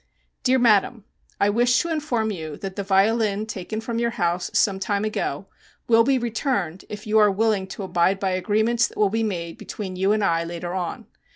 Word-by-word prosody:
Dear 260 Hz, 0 st, +3 dB
Madam: 225 Hz, -2 st, +3 dB, 0.4 s
I 205 Hz, -, +3 dB
wish 240 Hz, +3 st, +3 dB
to 340 Hz, -, -4 dB
inform 250 Hz, -9 st, -1 dB
you 160 Hz, -6 st, -6 dB
that 195 Hz, -1 st, -6 dB
the 200 Hz, -, -2 dB
violin 205 Hz, +2 st, +2 dB
taken 215 Hz, 0 st, -5 dB
from 230 Hz, +1 st, -3 dB
your 235 Hz, 0 st, +1 dB
house 175 Hz, -6 st, -1 dB
some 195 Hz, -2 st, +2 dB
time 200 Hz, +2 st, -1 dB
ago 215 Hz, -, -3 dB, 0.4 s
will 230 Hz, -1 st, +5 dB
be 270 Hz, +2 st, +2 dB
returned 225 Hz, -, -2 dB
if 210 Hz, 0 st, -7 dB
you 215 Hz, 0 st, +3 dB
are 210 Hz, -1 st, +6 dB
willing 205 Hz, -1 st, +1 dB
to 195 Hz, -, -7 dB
abide 185 Hz, +1 st, +1 dB
by 195 Hz, -1 st, 0 dB
agreements 220 Hz, +5 st, +1 dB
that -, -, -16 dB
will 210 Hz, -2 st, +3 dB
be 225 Hz, +1 st, 0 dB
made 170 Hz, -6 st, -3 dB
between 190 Hz, -3 st, -6 dB
you 190 Hz, +2 st, +1 dB
and 215 Hz, -1 st, +1 dB
I 165 Hz, -3 st, +2 dB
later 175 Hz, +1 st, -5 dB
on. 180 Hz, -2 st, -4 dB
205 Hz, 200 wpm, -23 LUFS, 190-225 Hz, 0.4 s, are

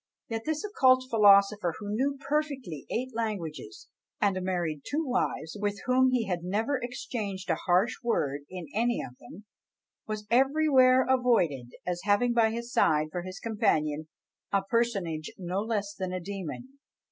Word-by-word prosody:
Yet 225 Hz, -1 st, -4 dB
this 310 Hz, -1 st, -1 dB
occult 260 Hz, -11 st, +4 dB
philosopher, 200 Hz, -4 st, +5 dB
who 205 Hz, -1 st, -6 dB
knew 275 Hz, +5 st, 0 dB
perfectly 275 Hz, -, -2 dB
eight 255 Hz, +2 st, -3 dB
languages, 170 Hz, -, -4 dB, 0.3 s
and 200 Hz, -2 st, +2 dB
married 175 Hz, -5 st, -2 dB
two 310 Hz, +2 st, -2 dB
wives, 245 Hz, -, -1 dB
with 205 Hz, -1 st, -1 dB
whom 255 Hz, +1 st, +4 dB
he 250 Hz, -3 st, +1 dB
had 180 Hz, -4 st, -2 dB
never 220 Hz, +10 st, -1 dB
exchanged 210 Hz, -6 st, -4 dB
a -, -, +2 dB
harsh 185 Hz, +5 st, +3 dB
word 145 Hz, -12 st, 0 dB
in 180 Hz, -2 st, -7 dB
any 235 Hz, +3 st, +1 dB
of 125 Hz, -, -9 dB
them, 180 Hz, -, -13 dB, 0.6 s
was 215 Hz, -1 st, -4 dB
everywhere 260 Hz, -1 st, +5 dB
avoided 225 Hz, -, +2 dB
as 175 Hz, -1 st, -2 dB
having 210 Hz, +4 st, +2 dB
by 230 Hz, -2 st, +4 dB
his 235 Hz, +2 st, -5 dB
side, 155 Hz, 0 st, +3 dB
for 175 Hz, -, -3 dB
his 185 Hz, +2 st, -8 dB
companion, 155 Hz, -9 st, 0 dB, 0.4 s
a 200 Hz, -1 st, +2 dB
personage 195 Hz, -8 st, -1 dB
no 185 Hz, +1 st, -3 dB
less 205 Hz, -2 st, -2 dB
than 185 Hz, -2 st, -4 dB
a 185 Hz, -, -2 dB
demon! 200 Hz, -, -7 dB
210 Hz, 155 wpm, -28 LUFS, 180-250 Hz, 0.6 s, philosopher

